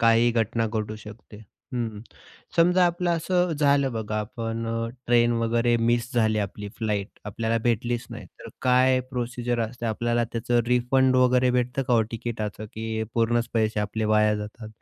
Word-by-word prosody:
काहीही 115 +1 +4
घटना 115 0 0
घडू 110 -1 -3
शकते. 105 0 -12 0.4
हं, 115 -4 -3 0.6
समजा 180 +2 +5
आपलं 175 0 -1
असं 175 +1 +1
झालं 140 -3 +2
बघा, 110 -1 -3
आपण 115 +1 -4
अ, 115 0 -2 0.2
ट्रेन 120 0 +4
वगैरे 120 +1 +2
मिस 120 +2 0
झाली 110 -2 +2
आपली, 105 0 -4
फ्लाईट 105 -3 -3
आपल्याला 115 +3 -1
भेटलीच 120 +1 -1
नाही - - -8
तर - - -9
काय 130 0 +4
प्रोसिजर 120 -1 -2
असते? 115 +1 -3
आपल्याला 120 +1 0
त्याचं 120 +1 +1
रिफंड 130 +2 +3
वगैरे 125 0 +4
भेटतं 125 +2 0
का 125 -2 +1
हो 115 - +4
तिकीटाचं? 110 -2 -4
की 110 0 -3
पूर्णच 115 0 +1
पैसे 110 -1 +1
आपले 105 +2 -2
वाया 105 0 +4
जातात? 105 +1 -7
115 Hz, 160 wpm, -25 LUFS, 110-125 Hz, 0.6 s, समजा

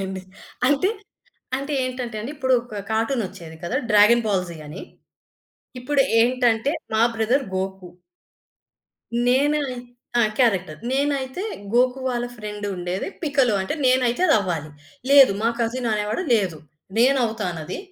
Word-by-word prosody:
అయినయండి. 190 0 -4 0.5
అంటే 290 +7 +3 0.7
అంటే 280 +2 -4
ఏంటంటే 250 -3 -4
అండి. 230 +6 -5
ఇప్పుడు 260 -1 0
ఒక 215 -4 -7
కార్టూన్ 225 +3 0
ఒచ్చేది 160 -1 -11
కదా! 200 +9 -2
'డ్రాగన్ 210 +3 +6
బాల్‌జీ' 180 -4 -1
అని. 150 - -8 1.0
ఇప్పుడు 280 +2 +2 0.2
ఏంటంటే 245 +2 +2 0.2
మా 220 - +3
బ్రదర్ 240 +5 +1
'గోకు.' 190 -1 -4 1.4
నేనే 285 +4 +3 0.6
ఆ! - - +5 0.2
క్యారెక్టర్. 190 -11 +1
నేనైతే 275 +3 -1 0.3
గోకు 250 +2 +3
వాళ్ళ 245 -1 -1
ఫ్రెండు 210 -1 -6
ఉండేది, 180 +2 -3
'పికలు' 275 -8 +2
అంటే 190 +10 -2
నేనైతే 255 +2 +2
అది - - +5
అవ్వాలి. 170 -6 -3 0.4
లేదు 275 -6 +8
మా 230 - +3
కసిన్ 240 +1 -1
అనేవాడు 210 +8 -1
లేదు, 190 -8 0 0.4
"నేను 265 +3 +5
అవుతానది. 180 -8 -4
235 Hz, 125 wpm, -23 LUFS, 195-260 Hz, 1.4 s, లేదు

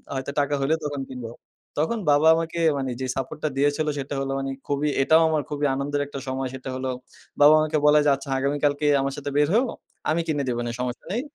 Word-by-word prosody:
হয়তো 135 +1 -3
টাকা 145 +1 -1
হলে 145 +4 +2
তখন 145 -2 -3
কিনব।" 125 -3 -6 0.5
তখন 225 +8 -1
বাবা 145 +2 +4
আমাকে 165 +1 -3 0.2
মানে 135 -2 -2
যে - - -1
সাপোর্টটা 135 +3 -3
দিয়েছিল, 145 +2 +1
সেটা 140 +1 -4
হলো 135 0 -2
মানে 135 0 -3 0.2
খুবই, 145 +1 0
এটাও 160 +4 +5
আমার 155 -2 +1
খুবই 145 0 -1
আনন্দের 145 +1 -1
একটা 140 -1 -7
সময়, 130 0 -2
সেটা 130 0 -7
হলো 130 0 -3 0.5
বাবা 150 +2 +9
আমাকে 155 0 0
বলে 150 0 +6
যে, - - +5
"আচ্ছা 140 0 -10
আগামীকালকে 145 +1 0 0.2
আমার 135 0 -2
সাথে 145 0 -4
বের 145 0 +4
হইয়ো। 240 +2 +3 0.4
আমি 165 +2 +2
কিনে 145 -3 0
দিব 120 - -1
নে, 120 - -2
সমস্যা 125 0 -4
নেই। 235 +5 0
145 Hz, 210 wpm, -24 LUFS, 135-150 Hz, 0.5 s, বাবা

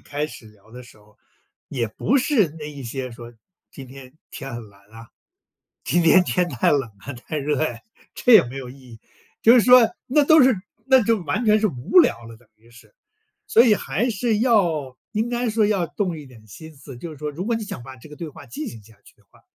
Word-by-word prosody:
开 145 +1 -4
始 115 - -13
聊 105 0 -21
的 125 +1 -11
时 115 -2 -18
候， 105 0 -25 0.5
也 120 -4 -3
不 250 - 0
是 240 - +1
那 150 - -7
一 140 -2 -10
些 130 +2 -5
说： 120 0 -11 0.4
“今 135 -2 -11
天 130 +1 -14 0.2
天 135 -5 -8
很 115 -3 -8
蓝 100 0 -22
啊， 115 +1 -13 0.8
今 175 +5 +1
天 180 +3 +5
天 180 -1 0
太 125 -6 0
冷 140 -2 +2 0.2
啊、 140 - -8
太 140 +5 -6
热 145 +1 -1
呀。” 120 -7 -2 0.4
这 250 - +2
也 210 - +8
没 125 +3 -9
有 125 -2 -8
意 135 - -14
义。 120 -4 -15 0.4
就 230 - +7
是 245 - +6
说， 250 -1 +6 0.2
那 290 +3 +3
都 315 -1 +6
是 255 -4 +4 0.3
那 265 -2 +5
就 225 -1 +1
完 220 +8 -2
全 215 0 +3
是 215 - +2
无 140 - +3
聊 115 - 0
了 115 0 -12
等 115 -1 -26
于 115 +2 -24
是。 120 - -19 0.5
所 230 - +6
以 220 -4 +5
还 200 - -2
是 220 0 -1
要 170 - +1 0.2
应 220 +2 -1
该 240 0 -2
说 215 -1 +2
要 195 -5 0
动 175 -2 -3
一 145 - -11
点 115 -4 -17
心 160 - -12
思， 135 -2 -12
就 170 - -8
是 - - -12
说 150 +1 -5
如 170 +6 -6
果 235 - 0
你 225 - -3
想 195 - -8
把 130 +1 -11
这 130 - -15
个 150 - -12
对 165 -2 -7
话 145 - -13
进 125 +5 -7
行 115 -3 -9
下 110 0 -20
去 - - -19
的 - - -30
话， - - -24
150 Hz, 255 characters per minute, -22 LUFS, -, 0.8 s, 也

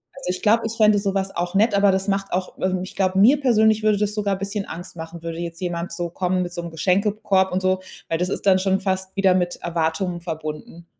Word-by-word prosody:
Also, 270 -9 -3
ich 185 - -5
glaube, 230 +1 +3
ich 225 - -3
fände 215 -1 +5
so 200 -1 -1
was 195 0 -2
auch 175 +1 -2
nett, 205 +2 +3
aber 200 0 +5
das 190 +1 -1
macht 195 0 -1
auch 185 +1 -3
ähm, 185 -1 0
ich 185 - -8
glaube, 190 -1 +1
mir 255 +8 +6
persönlich 220 -5 +3
würde 215 -2 +3
das 210 0 -1
sogar 200 -2 0
bisschen 200 +1 -3
Angst 175 +2 -8
machen, 165 0 -8
würde 165 0 -5
jetzt 170 +1 -6
jemand 175 -1 -3
so 170 0 -3
kommen 180 +1 -1
mit 175 -1 -3
so 175 0 -5
'm 170 - -7
Geschenkekorb 195 +3 +1
und 185 +1 -1
so, 185 0 +1 0.3
weil 165 - 0
das 180 +2 -1
ist 200 - -3
dann 190 -1 +6
schon 190 0 +1
fast 190 -1 -2
wieder 195 -2 +3
mit 175 -1 0
Erwartungen 170 +1 -2
verbunden. 160 0 -7
190 Hz, 245 wpm, -22 LUFS, 175-200 Hz, 0.3 s, mir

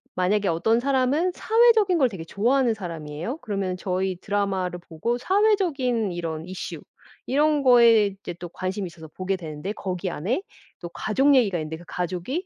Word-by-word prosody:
만약에 195 +2 +1
어떤 220 +8 +2
사람은 275 +6 +1
사회적인 445 -4 +4
걸 265 -5 +3
되게 185 -7 -8
좋아하는 240 +6 +2
사람이에요. 170 - -6
그러면 195 - -3
저희 185 0 -2
드라마를 190 -3 -1
보고 175 +8 -3
사회적인 315 - +1
이런 165 -2 -4
이슈 185 +1 -6 0.4
이런 295 +1 +2
거에 235 -4 +6
이제 195 -2 -7
또 175 0 -9
관심이 185 +2 -4
있어서 165 -2 -11
보게 185 +4 -3
되는데 160 +2 -6
거기 185 -3 -4
안에 195 - -2 0.4
또 175 - -6
가족 270 +10 +2
얘기가 210 -9 +3
있는데 155 +1 -5
그 175 - -14
가족이 180 - -3
200 Hz, 375 characters per minute, -24 LUFS, 175-260 Hz, 0.4 s, 거에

